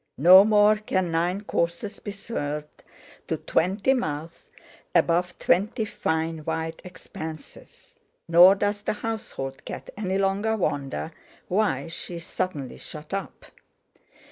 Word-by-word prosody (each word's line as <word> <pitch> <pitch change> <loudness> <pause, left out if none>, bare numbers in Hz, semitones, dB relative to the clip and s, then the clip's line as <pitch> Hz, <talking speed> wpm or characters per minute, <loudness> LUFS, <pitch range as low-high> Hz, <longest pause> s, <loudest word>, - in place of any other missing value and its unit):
no 180 +6 +9
more 210 0 +5
can 185 -4 -1
nine 175 +4 0
courses 170 0 -2
be - - -7
served 150 -8 -5 0.5
to - - -1
twenty 195 +9 +1
mouths 160 - -4 0.5
above 175 +1 +2
twenty 205 +4 +1
fine 160 -4 -2
white 160 +1 -4
expanses; 160 -3 -10 0.3
nor 175 +3 +8
does 205 +1 -1
the - - -1
household 210 -12 -5
cat - - -7
any 190 -2 -1
longer 200 +3 +1
wonder 145 -3 -2 0.4
why 180 -8 0
she 170 +1 -6
is 170 0 -7
suddenly 145 -8 -4
shut 150 +3 -9
up. 195 - -5
180 Hz, 120 wpm, -25 LUFS, 160-205 Hz, 0.5 s, no